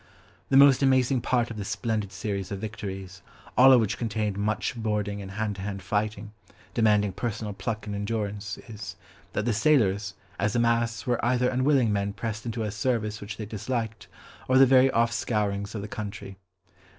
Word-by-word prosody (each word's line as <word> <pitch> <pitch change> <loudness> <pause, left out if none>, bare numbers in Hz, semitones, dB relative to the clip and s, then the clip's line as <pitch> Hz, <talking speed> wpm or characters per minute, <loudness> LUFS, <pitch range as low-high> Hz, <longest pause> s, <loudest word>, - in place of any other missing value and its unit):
The 135 - +5
most 140 -1 +7
amazing 130 -1 +3
part 120 0 +1
of 110 - -7
this 100 -1 -4
splendid 110 -4 -2
series 100 0 -4
of 100 - -2
victories, 95 -3 -6 0.3
all 130 +1 +8
of 130 - +8
which 110 0 -1
contained 110 -3 -1
much 105 +4 -1
boarding 105 -3 -2
and 95 - -7
hand 105 -1 -2
to - - -6
hand 100 -1 -5
fighting, 105 +2 -2 0.4
demanding 105 -3 +3
personal 105 0 -3
pluck 110 +1 -4
and 105 -1 -4
endurance, 105 -1 -3
is, 105 -5 -7 0.4
that 105 - -1
the 120 - +1
sailors, 105 -7 +2 0.2
as 105 +3 0
a - - +3
mass, 115 -1 +1
were 120 -2 0
either 125 +1 +2
unwilling 130 -3 +2
men 100 0 -1
pressed 110 +2 -5
into 115 0 -2
a 105 - -2
service 110 -1 -1
which 100 0 -7
they 110 - -5
disliked, 110 +1 -4 0.4
or 130 - +4
the 135 - +8
very 130 0 +6
off 115 -1 +2
scourings 105 -3 -1
of 100 - -4
the - - -5
country. 105 -2 -6
110 Hz, 185 wpm, -27 LUFS, 100-120 Hz, 0.4 s, all